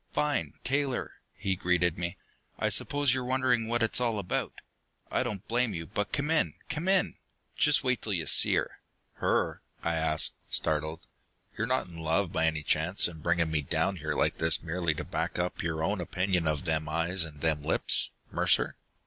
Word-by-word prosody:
"Fine, 150 -1 -1
Taylor!" 135 -1 -1 0.2
he 95 -1 -1
greeted 90 -1 +1
me. 85 +2 -4 0.4
"I - - 0
suppose 145 -3 +1
you're 130 -1 -1
wondering 125 -2 +1
what 120 0 +1
it's 115 +2 +3
all 115 -3 0
about. 95 -3 -2 0.6
I - - +1
don't 100 -3 -4
blame 120 -3 0
you. 80 0 -5
But 105 +3 -3
come 150 +2 -1
in, 165 - +2
come 155 +3 -3
in! 190 -1 +2 0.4
Just 150 -1 +3
wait 125 -2 +1
till 105 - -1
you 85 -4 0
see - - +7
her!" - - -2 0.4
"Her?" - - 0 0.2
I 85 - 0
asked, 80 -1 +3 0.2
startled. 80 +2 0 0.5
"You're 110 - -2
not 130 +2 0
in 85 -2 -11
love, 80 +3 0
by 80 0 +2
any 80 -1 -1
chance, 80 +6 +3
and 80 -3 -10
bringing 85 -1 +1
me 75 -1 +1
down 80 +6 -1
here 75 -1 -3
like - - 0
this 80 0 +3
merely 85 -1 -1
to - - -4
back - - -3
up 90 0 -2
your 80 -1 -2
own 100 +2 -1
opinion 90 -1 -1
of 75 +2 -1
them 80 -2 -1
eyes 85 +3 +1
and 75 -3 -7
them 80 -2 +1
lips, - - +2 0.2
Mercer?" - - +2
90 Hz, 190 wpm, -29 LUFS, 80-120 Hz, 0.6 s, see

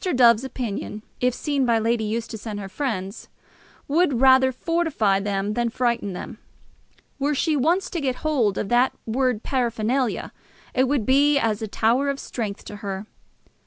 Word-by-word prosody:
Dove's 235 -2 +5
opinion, 225 -5 -5 0.2
if 250 0 +2
seen 285 -3 -1
by 235 -2 +3
Lady 225 0 +1
Eustace 220 0 -4
and 210 -2 -4
her 195 - -6
friends, 195 -2 -4 0.6
would 290 -4 +2
rather 260 0 +6
fortify 275 - +1
them 200 0 -2
than 240 +1 0
frighten 235 -4 -1
them. - - -7 0.8
Were 285 +2 +1
she 310 +3 +1
once 335 +8 +2
to 340 - -2
get 260 -3 0
hold 245 -10 +1
of 195 - -2
that 245 +2 +3
word 250 -1 0
paraphernalia, 240 0 -1 0.4
it 260 +1 +2
would 265 -5 0
be 285 +2 +4
as 225 -4 0
a 220 - -2
tower 235 +7 +1
of 280 0 -2
strength 210 -5 -5
to 210 - -8
her. 200 0 -5
Mr. - - -38
240 Hz, 165 wpm, -23 LUFS, 215-270 Hz, 0.8 s, rather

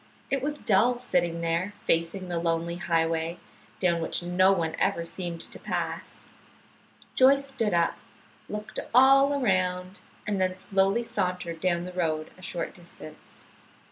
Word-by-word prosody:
It 275 -1 +1
was 295 +2 -2
dull, 235 +2 +3
sitting 175 -9 0
there 170 +4 -1
facing 170 +3 0
the 175 -1 -2
lonely 170 0 -1
highway, 165 0 0 0.4
down 170 -3 +2
which 165 - -1
no 180 +2 +4
one 165 -4 0
ever 190 -4 +1
seemed 170 -1 -5
to - - -6
pass. - - -4 0.9
Joyce 275 +2 +5
stood 230 -8 -1
up, 170 -1 +2 0.5
looked 210 0 -5 0.2
all 275 +2 +6
around, 185 -4 0 0.3
and 205 -3 -1
then 185 0 +1
slowly 195 +4 +1
sauntered 180 -6 -2
down 175 -1 +1
the 180 - -7
road 155 -3 -1
a - - -17
short 180 -2 -4
distance. 170 -3 -12
180 Hz, 140 wpm, -27 LUFS, 170-205 Hz, 0.9 s, all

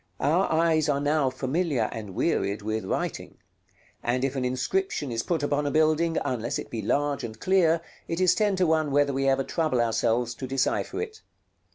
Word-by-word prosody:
Our 165 +7 +2
eyes 160 -1 +2
are 140 -1 +2
now 145 -1 +2
familiar 130 -1 -1
and 105 -4 -7
wearied 100 +1 0
with 110 -1 -2
writing; - - -3 0.6
and 125 +2 0
if 135 0 -2
an 130 - -1
inscription 135 +4 -1
is 115 0 -1
put 165 +3 -1
upon 145 0 0
a - - +1
building, 155 +2 +2
unless 120 +2 -2
it - - -7
be 115 - -3
large 145 +1 0
and 110 -1 -7
clear, 170 -3 +3 0.3
it 165 - -2
is 185 -1 +5
ten 205 -1 +1
to 185 -1 +2
one 160 -2 +2
whether 140 0 +2
we 135 0 +1
ever 135 0 +2
trouble 155 -2 0
ourselves 115 +1 +1
to 130 +2 -6
decipher 135 - -1
it. 440 -1 -9
140 Hz, 190 wpm, -26 LUFS, 125-160 Hz, 0.6 s, is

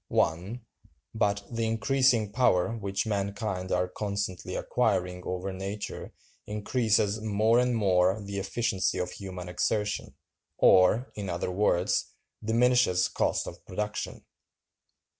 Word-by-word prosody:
(1.) 95 +9 0 0.5
But 100 -2 +1
the 115 -1 -1
increasing 115 -1 +2
power 115 -2 +2
which 100 -3 -2
mankind 100 -2 -2
are 90 0 +1
constantly 100 -3 -4
acquiring 90 0 0
over 90 +1 -3
nature 100 +2 -5 0.4
increases 105 0 +1
more 110 +2 +3
and 125 -1 +2
more 95 -1 +3
the 100 -1 -5
efficiency 95 -1 -1
of 90 - -2
human 95 -2 -7
exertion, 105 +4 -1 0.4
or, 95 +8 +5
in 100 -2 -5
other 85 +1 -2
words, 95 0 +1 0.3
diminishes 115 -5 +3
cost - - 0
of - - -9
production. 105 +2 -4
100 Hz, 115 wpm, -28 LUFS, 95-110 Hz, 0.5 s, or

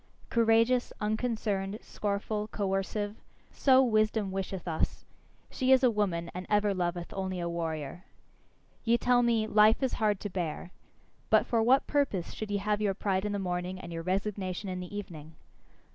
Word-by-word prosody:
Courageous, 230 +2 +3
unconcerned, 210 -2 -1
scornful, 210 +1 -2
coercive 205 +1 -2 0.3
so 265 -1 +5
wisdom 215 -3 +1
wisheth 190 -1 -4
us; 160 -2 -2 0.5
she 260 0 +1
is 265 0 +6
a 250 - +5
woman, 180 -6 -1
and 180 +1 -6
ever 210 -1 +3
loveth 175 -1 -3
only 190 -1 -3
a 170 - -2
warrior. 165 -1 -4 0.8
Ye 235 0 +3
tell 245 0 +3
me, 230 -2 +2
"Life 215 +3 +4
is 260 - 0
hard 210 -2 +2
to 205 - -3
bear." 175 -1 -4 0.6
But - - +5
for 230 -2 +1
what 260 +5 +4
purpose 275 - 0
should 215 - -5
ye 205 - 0
have 205 +1 -1
your 200 -2 +1
pride 190 -1 -1
in 210 - -1
the 205 - -1
morning 180 -1 -3
and 170 -2 -8
your 165 - -4
resignation 190 +1 -2
in 185 0 -3
the 180 +3 -6
evening? 160 -6 -8
205 Hz, 165 wpm, -30 LUFS, 185-220 Hz, 0.8 s, is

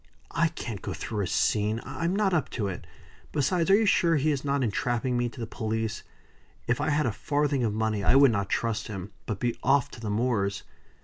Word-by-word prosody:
"I 165 0 +2
can't 115 - -6
go - - -4
through 105 -3 -3
a 95 - -1
scene. 105 +4 +1
I'm 170 +3 -2
not 200 -2 +2
up 160 -5 +1
to 105 -4 0
it. 90 -2 -6 0.4
Besides, 165 +5 +1
are 195 - +8
you 220 +2 +3
sure 170 -4 +4
he 150 +1 +2
is 140 -3 -2
not 140 -1 0
entrapping 120 +2 0
me 120 0 +1
to 120 - -13
the 115 - -2
police? 110 0 -3 0.6
If 120 - 0
I - - +1
had 150 0 +2
a 120 - +1
farthing 145 +4 0
of 110 - +1
money 110 -2 0
I - - +4
would 140 -2 +7
not 100 -3 -1
trust 115 -1 -1
him, 100 -2 -6 0.2
but 105 -3 -3
be 120 -1 0
off 135 0 +2
to - - -10
the 110 -2 -4
moors." 105 -3 0
120 Hz, 225 wpm, -27 LUFS, 110-145 Hz, 0.6 s, are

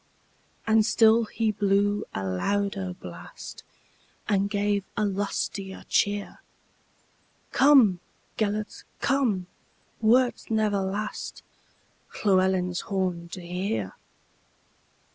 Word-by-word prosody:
And 220 0 +4
still 225 +1 +4
he 220 0 0
blew 205 0 +1
a 95 - -4
louder 195 - -1
blast, 85 0 -10 0.6
And 200 -1 +1
gave 205 -1 0
a 210 - +2
lustier 195 -1 -3
cheer:"Come, 205 +2 0 0.4
Gêlert, 210 0 -2 0.2
come, 250 -10 +1 0.6
wert 245 +3 +3
never 215 -2 +1
lastLlewelyn's 190 -2 -2
horn 185 -4 -2
to 180 - -7
hear. 175 - -2
200 Hz, 80 wpm, -26 LUFS, 185-215 Hz, 0.6 s, And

